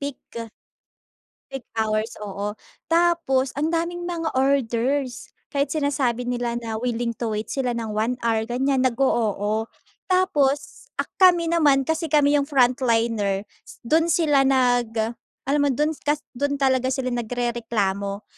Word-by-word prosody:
peak. 280 -2 -4 1.4
Peak 270 -2 -7
hours, 220 0 0
oo. 205 +1 -4 0.3
Tapos 330 -6 +2
ang 315 +3 0
daming 345 +1 -2
mga 330 -2 -2
orders. 265 0 0 0.2
Kahit 280 -1 +1
sinasabi 275 -5 0
nila 245 -1 -2
na 225 -2 -4
willing 240 0 -1
to 235 - -1
wait 215 - -4
sila 250 -3 -1
nang 225 -2 -4
1 220 +4 0
hour 225 -1 +1
ganiyan, 265 +2 +1
nag-o-oo. 225 -4 0 0.4
Tapos 305 -6 +1
a - - 0 0.2
kami 350 -3 +5
naman 290 -5 +4
kasi 320 +3 -1
kami 290 -1 +4
yung 280 - -2
frontliner, 230 -7 +2 0.4
dun 320 +7 +2
sila 295 -5 +3
nag 245 -3 +2 0.5
alam 280 +2 +1
mo - - +2
dun 300 +5 +1
kas 295 0 0
dun 285 +3 -1
talaga 260 -2 +2
sila 260 -1 -1
nagrereklamo. 225 -4 -2
260 Hz, 135 wpm, -23 LUFS, 230-290 Hz, 1.4 s, kami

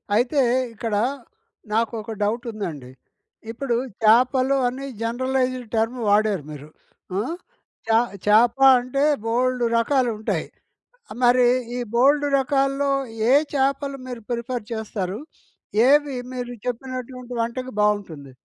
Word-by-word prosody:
అయితే, 250 +6 +2 0.3
ఇక్కడ 225 0 -4 0.8
నాకు 230 +1 +1
ఒక 225 +1 -8
డౌట్ 230 +4 -1
ఉందండి. 155 - -6 0.6
ఇప్పుడు 240 +1 -2 0.3
చాపలు 255 +4 +4
అని 265 +3 -4 0.2
జనరలైజ్డ్ 255 +1 -1
టర్మ్ 225 +3 0
వాడారు 205 -5 +2
మీరు. 150 0 -10 0.5
ఆ! - - +1 0.7
చ - - -2 0.4
చేప 225 +4 +5 0.2
అంటే 255 +3 -2 0.2
బోలేడు 245 +1 +1
రకాలు 250 +1 +2
ఉంటాయి. 215 - -2 0.8
మరి 245 0 +5 0.3
ఈ - - -2 0.2
బోలేడు 285 +4 +4
రకాల్లో 275 +1 +1 0.4
ఏ - - +6 0.2
చేపలు 275 0 0
మీరు 245 -2 -6
ప్రిఫర్ 240 0 -3
చేస్తారు? 210 -3 -4 0.7
ఏవి 290 -1 +3 0.2
మీరు 245 -1 -5
చెప్పినటువంటి 250 0 -5
వంటకి 255 +3 -3
బాగుంటుంది? 175 -10 -1
245 Hz, 110 wpm, -23 LUFS, 220-260 Hz, 0.8 s, ఏ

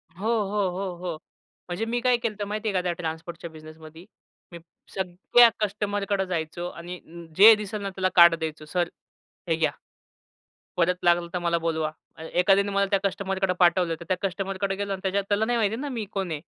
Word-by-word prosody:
हो, 205 +5 -4
हो, 200 -1 0
हो, 185 -1 -4
हो. 175 -2 -5 0.5
म्हणजे 180 +6 -2
मी 240 +1 -1
काय 250 -1 +3
केलं 230 -3 -3
तर 205 - -2
माहितीये 210 0 -3
का 185 - +1
त्या 180 -1 -1
ट्रान्सपोर्टच्या 165 +1 -6
बिझनेसमध्ये. 155 +2 -13 0.5
मी 170 - -9 0.3
सगळ्या 190 +6 +4
कस्टमरकडे 205 -1 -1
जायचो 175 -1 -3
आणि 175 +1 -8 0.4
जे 220 +3 +10
दिसेल 210 0 -5
ना, 200 - -3
त्याला 185 -1 -1
कार्ड 170 -1 +8
द्यायचो. 155 -1 -5
सर, 175 +2 -1 0.6
हे 165 - +3
घ्या. 160 -1 +1 1.1
परत 180 +1 +3
लागलं 175 0 +3
तर 180 - -1
मला 170 -1 0
बोलवा. 160 -2 -1 0.3
एखाद्याने 195 +4 +2
मला 200 0 +2
त्या 200 - +3
कस्टमरकडे 195 -1 0
पाठवलं, 175 -1 +3
तर 170 - -8
त्या 185 - +1
कस्टमरकडे 195 0 -2
गेलो 200 0 -3
आणि 190 - -4
त्याच्यात 195 +1 0
त्याला 205 +1 +2
नाही 240 +1 0
माहिती 220 -1 +1
आहे 240 - -5
ना 290 - -3
मी 235 -5 -3
कोण 195 -3 -2
आहे? 150 -2 -3
185 Hz, 190 wpm, -25 LUFS, 170-200 Hz, 1.1 s, जे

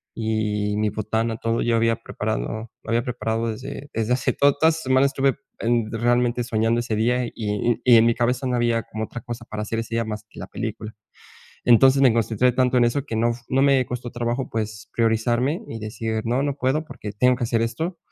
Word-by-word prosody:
y 105 -2 -1
mi 105 0 +1
botana, 110 +2 -2
todo. 115 +1 -1
Yo 120 -1 +1
había 115 0 +2
preparado 110 - -4
había 115 +1 +1
preparado 115 -2 -2
desde 135 +5 -7
desde 115 +2 0
hace 125 - 0
Toda 140 0 +4
la 160 - +6
semana 135 -4 +2
estuve 135 -1 +1 0.6
realmente 120 +1 +1
soñando 115 0 +1
ese 120 -2 -2
día 120 +3 +1
y 110 0 -1
y 125 -2 +7
en 115 - +5
mi 115 0 +3
cabeza 125 +2 0
no 125 - 0
había 120 -1 +1
como 110 +1 -5
otra 120 - -8
cosa 120 +1 -7
para 105 -1 -5
hacer 115 +1 -3
ese 115 0 -4
día 115 0 0
más 105 -1 -5
que - - -13
la 90 - -6
película. 110 0 -6 0.7
Entonces, 130 +3 +6
me 130 -4 +6
concentré 115 +2 +2
tanto 125 0 +2
en 120 - +5
eso 130 +4 0
que 115 - -4
no 120 +1 +2
fu 120 0 -12
no 135 +1 +2
me 135 -2 +4
costó 120 -1 -5
trabajo, 120 +2 -2
pues 110 -1 -4
priorizarme 120 +6 +1
y 115 - -6
decir: 110 +1 -3
"No, 120 +3 +1
no 140 -1 -1
puedo 140 +4 0
porque 105 -9 -8
tengo 125 +5 +3
que 125 - -4
hacer 115 -1 +1
esto". 160 +11 -3
115 Hz, 210 wpm, -23 LUFS, 110-125 Hz, 0.7 s, y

